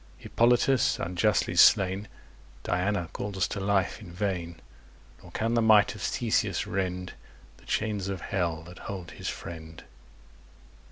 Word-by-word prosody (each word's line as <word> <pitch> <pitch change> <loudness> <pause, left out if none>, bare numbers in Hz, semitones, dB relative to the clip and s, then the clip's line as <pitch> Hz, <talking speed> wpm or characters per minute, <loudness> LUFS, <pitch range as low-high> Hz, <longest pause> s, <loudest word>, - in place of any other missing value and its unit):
Hippolytus, 125 +2 +2
unjustly 90 +5 0
slain, 95 +2 +5 0.6
Diana 90 0 0
calls 95 -3 -2
to - - -4
life 100 0 0
in 95 -5 -10
vain; 90 -3 -3 0.6
Nor - - -14
can 115 +1 -1
the 115 - +3
might 110 -2 +5
of - - -10
Theseus - - 0
rend 90 -1 -3 0.4
The - - -21
chains 105 -3 -1
of 95 -2 -4
Hell 85 -4 -2
that 90 +2 -12
hold 95 -4 -7
his - - -5
friend. 80 -2 -8
95 Hz, 130 wpm, -28 LUFS, 90-105 Hz, 0.6 s, slain